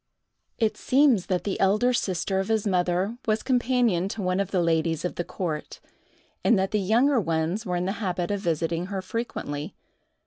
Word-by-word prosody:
It 220 -2 +1
seems 260 -8 +3
that 185 -2 0
the 200 - -2
elder 210 +6 +3
sister 190 -3 0
of 195 - -2
his 220 -1 +1
mother 185 +3 0
was 215 0 +1
companion 245 -8 +2
to 205 0 -4
one 185 +1 0
of 200 -2 -1
the 185 -3 +1
ladies 165 0 +1
of 180 - -2
the 175 - -3
court, 165 -4 -5 0.6
and 235 - +4
that 190 0 0
the 210 - +1
younger 240 +7 +3
ones 165 +4 -1
were 180 - -1
in 175 0 -1
the 190 - 0
habit 180 -2 -1
of 205 - -1
visiting 165 -1 -1
her 190 -1 -4
frequently. 170 -9 -4
190 Hz, 185 wpm, -26 LUFS, 175-220 Hz, 0.6 s, and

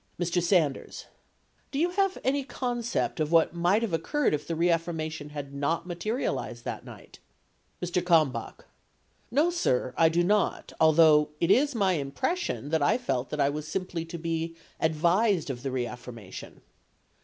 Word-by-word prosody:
Mr. 175 0 +1
Sanders. 170 -5 0 0.6
Do 275 - -5
you 345 +4 +2
have 390 0 +1
any 275 +2 +1
concept 240 -7 -2
of 155 0 0
what 165 -1 +4
might 175 +6 +2
have 215 -7 -2
occurred 280 - +1
if 150 0 -2
the 165 - -2
reaffirmation 160 -2 -1
had 145 -2 -7
not 155 +4 -1
materialized 200 +8 -3
that - - -4
night? - - -13 0.6
Mr. 175 0 0
Kalmbach. 160 -6 +1 0.6
No, 300 +7 +2
sir; 130 - 0
I 165 -1 +5
do 170 +2 +2
not, 205 +3 0
although 155 -1 +6
it 170 +2 +2
is 285 +3 +3
my 190 -5 +2
impres 260 - -1
sion 345 - -4
that 160 0 +1
I 145 - +3
felt 130 - -2
that 150 - -4
I 140 0 +3
was 150 +1 -5
simply 180 -2 -3
to 170 +1 -7
be 165 0 -3 0.2
advised 170 +2 +2
of 120 -2 -7
the 135 - -3
reaffir 125 -1 -4
mation. 100 -5 -10
170 Hz, 165 wpm, -28 LUFS, 150-205 Hz, 0.6 s, although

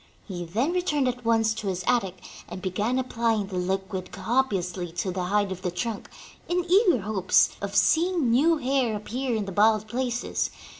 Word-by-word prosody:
He 175 -4 -5
then 230 - 0
returned 300 -7 +1
at 250 0 -3
once 225 -1 +2
to 220 -2 -6
his 185 -1 -2
attic 195 -7 0 0.3
and - - -6
began 205 +6 -1
applying 230 -4 0
the 190 -1 -6
Hquid 190 0 -3
copiously 190 -6 -1
to 185 +2 -2
the 180 0 -3
hide 205 +1 +1
of 185 -1 -5
the 180 - -1
trunk, 200 +5 -4 0.4
in 350 0 0
eager 360 - +4
hopes 195 -2 +3
of 200 0 -4
seeing 330 - +3
new 315 +7 +4
hair 260 -4 0
appear 240 +4 -3
in 215 -2 -1
the 195 - -6
bald 215 +2 +3
places. 245 +1 -2
220 Hz, 180 wpm, -26 LUFS, 190-255 Hz, 0.4 s, eager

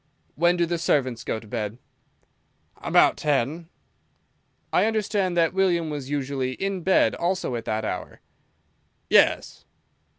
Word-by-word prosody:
"When 175 +3 +2
do 170 - +2
the 170 0 -2
servants 130 -7 0
go 110 - -3
to 110 - -15
bed?" 110 -1 -4 1.0
"About - - +3
ten." 150 +3 -1 1.0
"I - - +4
understand 205 -4 0
that 165 0 +3
William 175 -4 +1
was 140 -3 -5
usually 135 -2 -2
in 195 +5 -3
bed 190 +2 +3
also 175 -7 -1
at 115 -1 -5
that 110 0 -2
hour." - - -5 0.9
"Yes." - - +3
160 Hz, 130 wpm, -24 LUFS, 130-180 Hz, 1.0 s, I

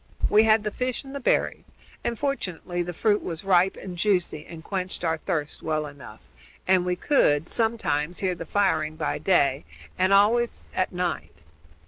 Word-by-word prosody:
We 215 +1 +6
had 220 -1 +4
the 210 - -2
fish 250 +2 -3
and 270 0 -10
the 280 - -4
berries, 250 - 0 0.3
and, 235 - -2
fortunately, 180 - -3
the 175 0 -3
fruit 205 +4 +1
was 165 0 -5
ripe 190 -1 +3
and 180 -2 -7
juicy 175 -5 0
and 165 -2 -10
quenched 185 -1 -4
our 165 -1 +1
thirst 150 -1 -3
well 155 -1 -1
enough, 140 - -11 0.5
and 185 -1 +3
we 180 - +1
could, 165 - +2
sometimes, 200 -9 0
hear 185 -2 0
the 165 -1 -8
firing 160 -6 +1
by - - -2
day, 140 -7 +2 0.4
and 185 +1 +3
always 225 +4 +3
at 185 - 0
night. 85 - -4
180 Hz, 170 wpm, -25 LUFS, 160-210 Hz, 0.5 s, We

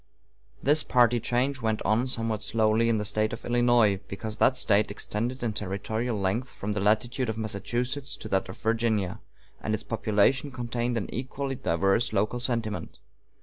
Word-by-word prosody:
This 150 +3 +4
party 120 -3 +3
change 130 +4 0
went 110 -1 0
on 115 +4 +2
somewhat 115 -3 -1
slowly 110 +2 +2
in 115 - +2
the 105 - -2
State 110 +1 0
of - - -7
Illinois, 120 -4 +3
because 110 +2 -6
that 130 - +4
State 105 -4 +3
extended 115 +5 -3
in 115 -3 0
territorial 105 +4 -2
length 100 +6 -1
from 105 - -5
the 105 - -1
latitude 115 +5 +1
of 110 - -3
Massachusetts 120 +6 -3
to - - -7
that 95 0 0
of 95 - -8
Virginia, 110 -3 0 0.4
and 110 - 0
its 110 - -5
population 115 +5 +2
contained 120 -1 -2
an 105 - -2
equally 135 +2 -3
diverse 100 -2 +1
local 105 +4 +1
sentiment. 115 -4 -2
115 Hz, 165 wpm, -27 LUFS, 105-120 Hz, 0.4 s, This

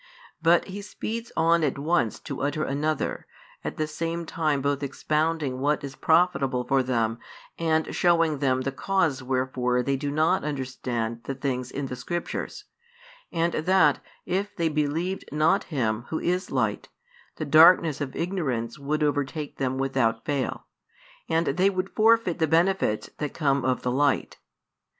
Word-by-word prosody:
But 170 +1 +4
He 200 +1 -7
speeds 225 +3 -5
on 165 0 +3
at 150 - 0
once 145 -6 0
to 140 -3 -6
utter 145 +2 -1
another, 150 +2 -2 0.4
at - - -4
the 155 - 0
same 165 +2 -3
time 155 -3 0
both 140 +1 -1
expounding 150 -1 -1
what 145 +2 +1
is 135 -1 -6
profitable 145 -7 +2
for 135 +1 +2
them 115 -3 0 0.4
and 160 -1 +1
shewing 165 -4 +3
them 130 -2 +1
the 135 +1 -2
cause 160 -2 0
wherefore 125 -1 0
they 140 +2 0
do 140 +2 -3
not 155 +5 +2
understand 125 -5 -3
the 135 - -3
things 130 -2 -2
in 140 +1 -4
the 125 - -5
Scriptures, 170 +8 -4 0.7
and 170 0 0
that, 160 -3 +3 0.3
if 200 +3 -2
they 165 -2 +1
believed 155 +5 -1
not 155 +2 +2
Him 120 -7 -1
Who 160 - -1
is 180 +2 -1
Light, - - -1 0.5
the 155 - -4
darkness 160 0 +6
of 135 -2 -4
ignorance 135 -11 -2
would 150 +2 -1
overtake 145 0 -2
them 130 -1 -1
without 130 -4 0
fail, 140 -3 -2 0.6
and 165 +1 +2
they 180 +8 +2
would 185 0 -3
forfeit 225 -5 +3
the 160 - +2
benefits 165 - +1
that 150 -2 -3
come 140 -4 +1
of 130 0 0
the 125 - 0
Light. 140 +2 +1
150 Hz, 155 wpm, -26 LUFS, 130-165 Hz, 0.7 s, darkness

